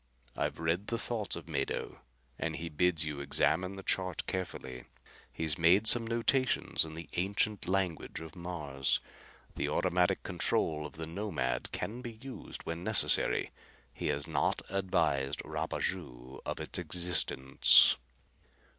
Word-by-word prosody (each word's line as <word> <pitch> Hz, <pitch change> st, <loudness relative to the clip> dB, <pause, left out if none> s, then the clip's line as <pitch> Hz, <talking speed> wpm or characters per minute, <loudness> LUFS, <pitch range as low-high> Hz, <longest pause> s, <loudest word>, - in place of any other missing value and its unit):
"I've -, -, -1 dB
read 85 Hz, +5 st, 0 dB
the 115 Hz, -, -1 dB
thoughts 115 Hz, -3 st, -2 dB
of 85 Hz, -1 st, -8 dB
Mado 70 Hz, -4 st, -3 dB, 0.4 s
and 80 Hz, -1 st, -2 dB
he 85 Hz, +1 st, -5 dB
bids 80 Hz, +1 st, +2 dB
you 75 Hz, -2 st, -4 dB
examine 90 Hz, +6 st, +1 dB
the 95 Hz, -, -8 dB
chart 95 Hz, -2 st, 0 dB
carefully. 65 Hz, -9 st, -5 dB, 0.5 s
He's 80 Hz, -2 st, 0 dB
made 90 Hz, +6 st, +5 dB
some 115 Hz, 0 st, +5 dB
notations 120 Hz, +3 st, +2 dB
in 80 Hz, -1 st, -6 dB
the 85 Hz, 0 st, -7 dB
ancient 100 Hz, +3 st, +1 dB
language 95 Hz, -3 st, -1 dB
of 80 Hz, -2 st, -9 dB
Mars. 75 Hz, -7 st, -1 dB, 0.6 s
The -, -, -1 dB
automatic 90 Hz, -1 st, +2 dB
control 75 Hz, -1 st, 0 dB
of -, -, -16 dB
the 80 Hz, 0 st, -5 dB
Nomad 80 Hz, -7 st, -2 dB
can 120 Hz, +4 st, -3 dB
be 120 Hz, -2 st, -6 dB
used 130 Hz, +4 st, -7 dB
when 85 Hz, +1 st, -4 dB
necessary. -, -, +2 dB, 0.4 s
He -, -, -3 dB
has 70 Hz, +3 st, 0 dB
not 80 Hz, -, +1 dB
advised 80 Hz, -8 st, +1 dB
Rapaju 60 Hz, +2 st, -3 dB
of -, -, -3 dB
its -, -, -4 dB
existence." 85 Hz, -6 st, +4 dB
85 Hz, 135 wpm, -32 LUFS, 75-95 Hz, 0.6 s, made